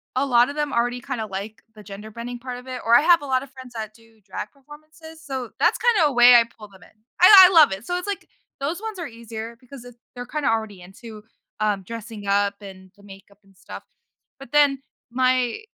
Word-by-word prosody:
a 265 Hz, -, +1 dB
lot 245 Hz, -2 st, +3 dB
of 285 Hz, -, -7 dB
them 295 Hz, -1 st, -2 dB
already 245 Hz, +1 st, -1 dB
kinda 245 Hz, -5 st, -5 dB
like 210 Hz, +3 st, -8 dB
the 215 Hz, -, -13 dB
gender 205 Hz, +2 st, -10 dB
bending 240 Hz, +2 st, -7 dB
part 250 Hz, 0 st, -7 dB
of 255 Hz, -, -16 dB
it 255 Hz, -1 st, -6 dB
or 230 Hz, -, +2 dB
I 290 Hz, -, +6 dB
have 340 Hz, 0 st, +4 dB
a -, -, -6 dB
lot 260 Hz, -2 st, 0 dB
of 275 Hz, -, -13 dB
friends 260 Hz, -2 st, -13 dB
that 215 Hz, -1 st, -6 dB
do 225 Hz, -1 st, -23 dB
drag 190 Hz, -1 st, -8 dB
performances, 310 Hz, +3 st, -15 dB
so 260 Hz, -5 st, -6 dB
that's -, -, +2 dB
kinda 430 Hz, -10 st, +3 dB
a -, -, -6 dB
way 245 Hz, 0 st, +7 dB
I 235 Hz, -, +7 dB
pull 220 Hz, -2 st, -15 dB
them 190 Hz, -2 st, -19 dB
in. -, -, -19 dB, 0.3 s
I 375 Hz, 0 st, +10 dB
I 375 Hz, -, -3 dB
love 310 Hz, -7 st, +7 dB
it, 195 Hz, +4 st, -8 dB
so 355 Hz, -, -2 dB
it's 360 Hz, +3 st, -6 dB
like 405 Hz, -, -5 dB, 0.3 s
those 315 Hz, +8 st, -4 dB
ones 440 Hz, -3 st, -6 dB
are 335 Hz, -, -5 dB
easier 230 Hz, 0 st, -9 dB
because 255 Hz, -1 st, -13 dB, 0.3 s
they're 245 Hz, -, -7 dB
kinda 295 Hz, +1 st, -2 dB
already 220 Hz, -4 st, -3 dB
into, 215 Hz, +3 st, -13 dB, 0.4 s
um, 205 Hz, -2 st, 0 dB
dressing 225 Hz, 0 st, -9 dB
up 200 Hz, +1 st, 0 dB
and 190 Hz, -2 st, -13 dB
the 200 Hz, -, -21 dB
makeup 200 Hz, 0 st, -16 dB
and 195 Hz, -, -25 dB
stuff -, -, -11 dB, 0.6 s
but 270 Hz, -3 st, -13 dB
then 285 Hz, -2 st, +3 dB, 0.3 s
my 255 Hz, -, 0 dB
240 Hz, 230 wpm, -22 LUFS, 215-280 Hz, 0.6 s, I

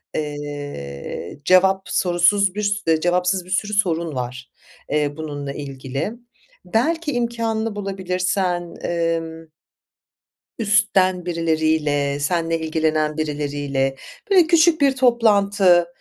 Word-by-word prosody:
Eee, 145 Hz, -, -6 dB
cevap 190 Hz, +2 st, +4 dB
sorusuz 185 Hz, +2 st, +2 dB
bir 210 Hz, -, -2 dB, 0.2 s
sür 160 Hz, -1 st, +2 dB
cevapsız 180 Hz, +1 st, +1 dB
bir 180 Hz, -, -15 dB
sürü 205 Hz, +2 st, -1 dB
sorun 170 Hz, -6 st, 0 dB
var. 125 Hz, 0 st, -5 dB, 0.4 s
Eee, 150 Hz, -1 st, 0 dB
bununla 145 Hz, -3 st, -5 dB
ilgili. 135 Hz, +4 st, -5 dB, 0.5 s
Belki 295 Hz, -, 0 dB
imkânını 230 Hz, -3 st, -2 dB
bulabilirsen, 185 Hz, -2 st, -2 dB
emm 165 Hz, -1 st, -2 dB, 1.1 s
üstten 200 Hz, -4 st, +2 dB
birileriyle 155 Hz, -4 st, 0 dB
seninle 165 Hz, +2 st, 0 dB
ilgilenen 155 Hz, -1 st, 0 dB
birileriyle 145 Hz, -3 st, -2 dB, 0.4 s
böyle 360 Hz, -4 st, +6 dB
küçük 330 Hz, -2 st, +4 dB
bir 275 Hz, -1 st, +4 dB
toplantı. 200 Hz, -8 st, +4 dB
175 Hz, 95 wpm, -21 LUFS, 150-200 Hz, 1.1 s, böyle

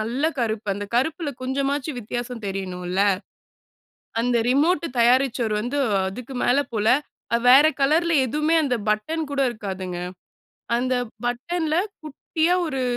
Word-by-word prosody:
நல்ல 235 Hz, +5 st, -2 dB, 0.2 s
கருப்பு. 220 Hz, -2 st, -1 dB
அந்த 205 Hz, +1 st, -4 dB
கருப்புல 300 Hz, +5 st, 0 dB
கொஞ்சமாச்சும் 275 Hz, +2 st, -1 dB
வித்தியாசம் 240 Hz, +1 st, -5 dB
தெரியணும்ல்ல. 185 Hz, -1 st, -3 dB, 1.2 s
அந்த 245 Hz, 0 st, +1 dB
ரிமோட்டு 320 Hz, +7 st, +2 dB
தயாரிச்சவரு 240 Hz, -2 st, +3 dB
வந்து 250 Hz, +6 st, -2 dB, 0.3 s
அதுக்கு 250 Hz, +6 st, -8 dB
மேல 245 Hz, -, +3 dB, 0.2 s
போல. 215 Hz, -2 st, -1 dB, 0.5 s
அ -, -, +1 dB
வேற 275 Hz, +5 st, +8 dB
கலர்ல 320 Hz, +5 st, +3 dB
எதுவுமே 300 Hz, +6 st, +1 dB
அந்த 260 Hz, -4 st, +1 dB
பட்டன் 310 Hz, +10 st, 0 dB
கூட 280 Hz, -1 st, -1 dB
இருக்காதுங்க. 190 Hz, -5 st, -5 dB, 0.8 s
அந்த 255 Hz, +2 st, 0 dB, 0.3 s
பட்டன்ல, 310 Hz, +6 st, -1 dB, 0.3 s
குட்டியா 315 Hz, +3 st, 0 dB
ஒரு 270 Hz, -4 st, -2 dB
250 Hz, 120 wpm, -23 LUFS, 220-295 Hz, 1.2 s, வேற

